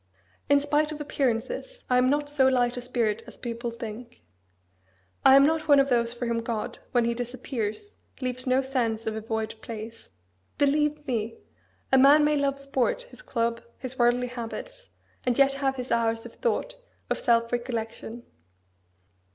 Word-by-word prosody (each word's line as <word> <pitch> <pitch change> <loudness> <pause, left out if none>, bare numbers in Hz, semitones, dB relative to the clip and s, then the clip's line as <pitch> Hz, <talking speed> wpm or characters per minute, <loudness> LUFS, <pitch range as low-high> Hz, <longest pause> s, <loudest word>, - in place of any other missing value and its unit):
In 285 0 +6
spite 295 +2 +1
of 305 - -6
appearances, 295 - -2
I 250 0 +4
am 255 +1 +3
not 290 +1 +1
so 285 -2 +3
light 245 -2 +2
a 245 - -4
spirit 230 -3 0
as - - -11
people 235 0 -4
think. 235 +1 -8 1.0
I 265 - +8
am 275 0 +8
not 315 +1 +1
one 285 -2 +7
of 275 0 +3
those 235 -2 +2
for 240 +1 -4
whom 235 -1 0
God, 230 -2 -4
when 240 -2 +3
He 235 - +1
disappears, 245 - -4 0.2
leaves 255 0 -3
no 255 +1 +3
sense 235 -4 -1
of 220 - -2
a 220 - -4
void 220 0 -3
place. 225 0 -8 0.5
Believe 295 +1 +2
me! 230 -4 -2 0.5
a 265 - +6
man 285 +3 +7
may 300 0 +3
love 280 -1 0
sport, 275 - 0
his - - -10
club, 230 - -1 0.2
his 260 0 -7
worldly 240 +1 +3
habits, 250 - -7 0.3
and 245 -2 +1
yet 275 0 +5
have 275 -1 0
his 250 -1 -6
hours 230 -1 +1
of 235 - -10
thought, - - -1 0.4
of - - +1
self 230 -1 +2
recollection. 235 -1 -4
250 Hz, 170 wpm, -27 LUFS, 230-280 Hz, 1.0 s, I